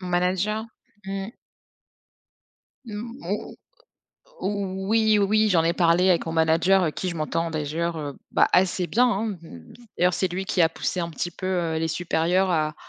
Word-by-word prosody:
Mon 185 - -6
manager, 185 +5 0 0.4
mmh. 195 +2 -4 1.5
Mmh, 230 +3 -7
mo - - -4 0.9
o 190 -2 -3
oui, 220 -1 +4
oui, 215 +2 +3
j'en 170 -4 +3
ai 170 - +2
parlé 175 +1 +3
avec 170 -1 +2
mon 165 - -3
manager 165 +4 +3
avec 155 -3 -1
qui 185 - -2
je 175 - -3
m'entends 165 +2 -1
d'ailleurs, 160 +3 -2
heu, 145 -2 -6
bah, - - +4
assez 180 0 +2
bien, 245 +3 +3
hein, 220 0 0 0.2
mmh, 85 - -13 0.2
d'ailleurs, 180 0 +3
c'est 190 - +1
lui 185 +2 -4
qui 190 -2 -1
a 160 - +5
poussé 180 - -3
un 170 - -2
petit 175 +2 -3
peu, 185 +2 -7
heu, 170 -4 0
les 165 0 -1
supérieurs 175 +3 +1
à 155 -3 0
180 Hz, 175 wpm, -24 LUFS, 165-195 Hz, 1.5 s, a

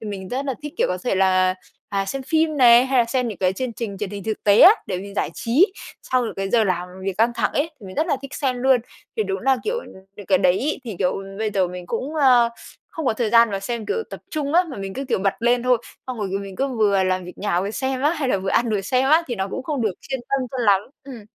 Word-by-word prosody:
thì 220 - -8
mình 195 -2 -6
rất 260 +5 -3
là 270 - -1
thích, 295 - -6
kiểu, - - +2
có 180 - -2
thể 245 - +1
là, 185 -1 +3 0.3
à, 195 -1 -1
xem 270 +6 -4
phim 315 +2 +1
này, 245 -1 +7
hay 265 -1 +2
là 240 - +5
xem 250 +1 -1
những 210 - -6
cái 185 -1 +2
chương 250 +4 -4
trình 205 -3 -5
truyền 205 -1 -4
hình 200 -1 -7
thực 220 -1 -4
tế 205 0 +5
á, 360 - +11 0.2
để 180 - -3
mình 200 +1 -9
giải - - -1
trí 305 - +2 0.4
sau 250 -1 +3
những - - -5
cái 195 0 -3
giờ 230 -2 +4
làm 180 -2 -1 0.2
việc 195 0 -3
căng 230 +2 +3
thẳng - - 0
ấy, 310 +3 0
thì 200 - -11
mình 185 - -9
rất 315 +3 +1
là 300 - +1
thích 275 +1 -8
xem 260 -4 -1
luôn. 255 -1 +3 0.4
Thì 220 - +2
đúng 195 -1 -3
là, 265 +1 +3
kiểu, 460 +3 -1 0.4
những 205 - -10
cái 190 -2 +3
đấy 185 0 +3
ấy, 290 +1 -2
thì, 220 -6 -6
kiểu, 185 0 0 0.2
bây 220 -1 -1
giờ 190 -2 +2
mình 180 0 -8
cũng, 260 - -4
à, 255 -6 +5 0.4
không 320 -4 -5
có - - +3
thời 220 -1 -1
gian 230 -1 +6
mà 195 -1 -3
xem, 225 +2 -4
kiểu, 450 - -1
tập - - -8
trung 295 -2 -2
á, 355 - +6
mà 270 - -7
mình 195 -1 -6
cứ, 275 - -4
kiểu, 255 -6 0
bật 195 0 0
lên 240 +1 +2
thôi, 250 -1 +3 0.3
xong 255 -3 -5
rồi 205 - -2
mình 195 -1 -8
cứ 275 +1 0
vừa 200 -3 +3
làm 185 -1 0
việc 180 - -11
nhà 180 -4 0
vừa 200 +2 -3
xem 265 +2 -2
á, 295 - +4
hay 300 -6 -2
là 200 - +1
vừa 190 0 -3
ăn 235 -1 +2
vừa 210 -2 0
xem 255 +7 +1
á, 320 +2 +6
thì 245 - -3
nó 190 -2 -3
cũng 260 - -4
không 285 -3 -2
được 215 -3 +1
chuyên 265 -2 -5
tâm 270 -2 0
cho 265 - -5
lắm. 200 -4 +4 0.2
Ừm. 245 -6 -10
230 Hz, 295 wpm, -22 LUFS, 195-265 Hz, 0.4 s, á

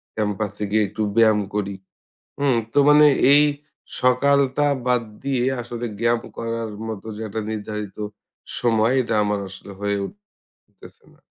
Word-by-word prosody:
ক্যাম্পাসে 105 -1 -2
গিয়ে 110 0 +3
একটু 100 - -6
ব্যায়াম 110 -2 +5 0.2
করি। 100 -1 -2 0.6
হুম? 140 -4 +2 0.2
তো - - +2
মানে 150 0 +7 0.3
এই 145 +1 +7 0.6
সকালটা 140 +2 +3 0.2
বাদ 125 -1 +2 0.2
দিয়ে 135 -3 0 0.2
আসলে 120 0 -5
ব্যায়াম 115 0 +2 0.2
করার 115 -1 -3 0.2
মত 110 -3 -5
যে - - -8
একটা 110 +2 -3
নির্ধারিত 105 -1 -5 0.6
সময়, 115 0 +2
এটা 115 - -2
আমার 105 0 0
আসলে 95 +1 -11
হয়ে 100 0 0 0.5
উঠতেছে - - -19
না। - - -27
115 Hz, 140 wpm, -22 LUFS, 105-125 Hz, 0.6 s, মানে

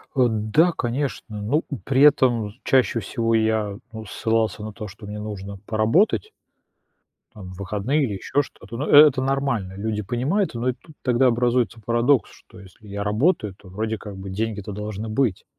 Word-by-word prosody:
Э, 125 -2 +4
да, 110 +11 +2
конечно. 120 -4 -3
Ну, 140 +10 +1 0.2
при 135 0 +2
этом 125 -7 +5
з 120 - -23
чаще 125 -4 +3
всего 115 +3 -1
я, 110 -2 +1 0.2
ну, 110 0 -7
ссылался 110 +1 -1
на 110 -1 -6
то, 105 +1 -7
что 100 +2 -12
мне 105 +1 -6
нужно 100 -2 -6
поработать 135 - +2 1.0
там 95 -4 -10
в 95 - -12
выходные 105 +10 0
или 110 -6 -1
еще 145 +8 0
что-то. 115 -4 -10
Ну, 145 - -2
э 150 +1 +10
это 130 -2 0
нормально. 135 -8 -1
Люди 105 0 -2
понимают, 130 - 0
но 120 +2 -1
и - - 0
тут 155 +4 -19
тогда 125 +1 +3
образуется 120 -1 +1
парадокс, 120 +4 +2
что 95 - -17
если 100 +2 -16
я 100 0 -4
работаю, 105 - +1
то 95 -2 -16
вроде 110 +3 -3
как 100 -2 -9
бы 95 0 -7
деньги-то 105 0 -3
должны 105 +1 -5
быть. 110 -3 0
110 Hz, 180 wpm, -23 LUFS, 105-130 Hz, 1.0 s, э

